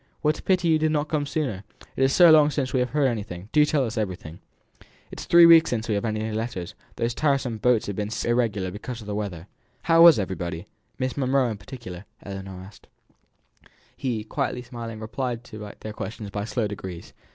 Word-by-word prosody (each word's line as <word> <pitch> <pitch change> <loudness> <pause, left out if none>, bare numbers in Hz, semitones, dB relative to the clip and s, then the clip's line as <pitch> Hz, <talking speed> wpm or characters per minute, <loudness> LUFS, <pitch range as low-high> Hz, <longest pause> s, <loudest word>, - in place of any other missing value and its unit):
What 150 0 +1
a - - -9
pity 180 -2 +1
you 160 -1 +4
did 155 0 +1
not 150 0 -1
come 145 -2 -1
sooner! 130 -12 -2 0.3
It - - -3
is 135 - +3
so 175 +2 +7
long 150 -2 +6
since 140 -3 -2
we 130 - +2
have 125 0 0
heard 150 -1 +1
anything; 100 -6 -3
do 150 - +5
tell 145 -3 +1
us 110 -1 -3
everything! 90 -5 -5 0.7
It - - -8
is - - -7
three 170 0 +8
weeks 165 -1 +7
since 115 -2 -2
we 110 - 0
have 100 - -1
had 110 -2 -1
any 110 +1 -3
letters; 110 -5 -4 0.2
those 115 +1 -1
tiresome 135 -5 0
boats 125 -1 +2
have 100 - -4
been 105 0 -2
so 115 - -3
irregular 110 -6 0
because 115 +4 -7
of - - -10
the 105 - -4
weather." 100 -6 -4 0.4
"How 165 0 +5
was 170 -5 +9
everybody 90 -4 -4 0.3
Miss 130 0 -2
Monro 135 -1 +2
in 105 - -5
particular?" 105 -9 -9 0.2
Ellinor 95 -2 -7
asks. 95 0 -16 1.1
He, 120 -5 -3
quietly 125 +3 -3
smiling, 115 -2 -7
replied 115 +2 -4
to 105 -4 -9
their 110 - -6
questions 105 -1 -6
by 105 0 -3
slow 115 0 -1
degrees. 95 -4 -8
115 Hz, 210 wpm, -25 LUFS, 105-135 Hz, 1.1 s, was